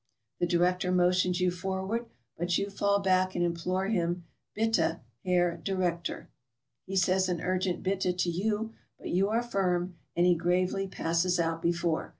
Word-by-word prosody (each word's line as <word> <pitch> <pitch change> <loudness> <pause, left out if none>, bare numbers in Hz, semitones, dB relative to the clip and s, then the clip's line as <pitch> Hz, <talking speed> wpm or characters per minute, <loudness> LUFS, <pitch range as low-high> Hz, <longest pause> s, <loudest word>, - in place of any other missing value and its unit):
The 175 - +2
director 180 +2 +2
motions 180 0 +3
you 180 0 +2
forward, 190 +5 -3 0.3
but 175 +1 0
you 200 0 -2
fall 200 0 +2
back 185 -1 +2
and 175 - +2
implore 180 +3 -1
him, 175 -4 0 0.3
'Bitte, 225 -6 +1 0.2
Herr 175 -1 +2
Directeur.' 180 -3 -2 0.6
He 195 - -4
says 185 0 +3
an 175 -2 -1
urgent 185 0 -1
'Bitte' 185 -2 0
to 180 -1 +1
you; 215 +5 -1 0.2
but - - -7
you 195 +3 +2
are 230 +2 +1
firm, 180 -5 -1 0.2
and 175 - +3
he 180 - +6
gravely 180 +3 0
passes 175 0 0
out 165 -1 0
before. 170 -1 0
180 Hz, 160 wpm, -29 LUFS, 175-190 Hz, 0.6 s, he